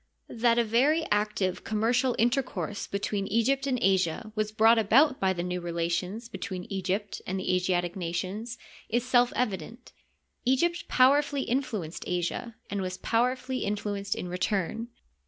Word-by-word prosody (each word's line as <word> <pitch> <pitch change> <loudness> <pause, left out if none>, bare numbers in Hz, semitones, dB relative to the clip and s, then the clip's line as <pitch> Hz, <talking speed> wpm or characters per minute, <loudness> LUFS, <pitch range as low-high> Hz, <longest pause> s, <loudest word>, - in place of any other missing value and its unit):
That 235 0 +2
a 235 - +4
very 270 +9 +2
active 205 -3 0
commercial 235 +4 +1
intercourse 240 -3 -1
between 200 0 -2
Egypt 265 +6 +1
and 260 -2 +1
Asia 190 -1 +1
was 215 -1 -1
brought 225 +1 +5
about 260 +6 +4
by 190 -1 +2
the 175 -2 -2
new 180 0 -3
relations 175 +6 -2
between 185 -6 -5
Egypt 195 +2 -2
and 190 +1 -2
the 185 - 0
Asiatic 180 -1 0
nations 190 +6 -4 0.3
is 240 +2 0
self 245 -1 +4
evident. 235 +2 -3 0.5
Egypt 340 +8 +1
powerfully 280 +2 +4
influenced 225 - -2
Asia, 180 +6 -2
and 200 -1 -3
was 185 0 -3
powerfully 255 +4 0
in 205 +1 0
fluenced 200 -1 -3
in - - -5
return. 195 +5 -1
215 Hz, 145 wpm, -28 LUFS, 185-245 Hz, 0.5 s, brought